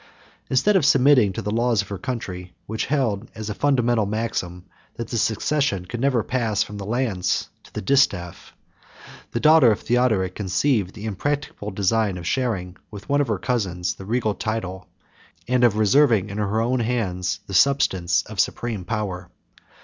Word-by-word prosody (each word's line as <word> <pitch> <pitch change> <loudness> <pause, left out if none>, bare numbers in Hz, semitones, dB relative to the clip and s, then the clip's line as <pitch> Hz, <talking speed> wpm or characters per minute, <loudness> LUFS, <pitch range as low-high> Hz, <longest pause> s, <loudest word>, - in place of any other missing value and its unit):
Instead 200 +11 +3
of 185 - +4
submitting 135 -5 +5
to - - -5
the 105 - -2
laws 115 -1 +1
of 100 - -16
her 100 - -4
country 90 -7 -5
which 110 +1 -3
held 120 -7 -1
as 110 -1 -5
a - - -2
fundamental 120 -4 +1
maxim, 100 -5 -3 0.3
that 115 - -6
the 120 - -2
succession 110 -4 0
could 120 +6 -6
never 130 -5 +2
pass 115 -5 0
from 105 - -9
the 100 - -6
lance 110 -7 -1
to - - -19
the - - -5
distaff, 95 -9 0 0.7
the 115 - -2
daughter 155 -4 +6
of 105 - -1
Theodoric 110 -7 +1
conceived 105 +1 0
the 105 0 -8
impracticable 110 +1 -3
design 100 0 0
of 85 - -8
sharing, 95 -5 -2
with 105 -1 -11
one 145 +1 +3
of 140 - 0
her 110 -3 0
cousins, 90 -6 -1
the 95 - -11
regal 110 0 0
title, 95 -3 -4 0.6
and 125 0 +2
of 115 -3 +4
reserving 110 -2 +3
in 100 - -5
her 105 +1 0
own 120 +3 +1
hands 105 -7 -1
the 100 - -9
substance 95 -6 +3
of - - -9
supreme 115 -6 -1
power. 95 -4 -4
110 Hz, 170 wpm, -23 LUFS, 95-125 Hz, 0.7 s, daughter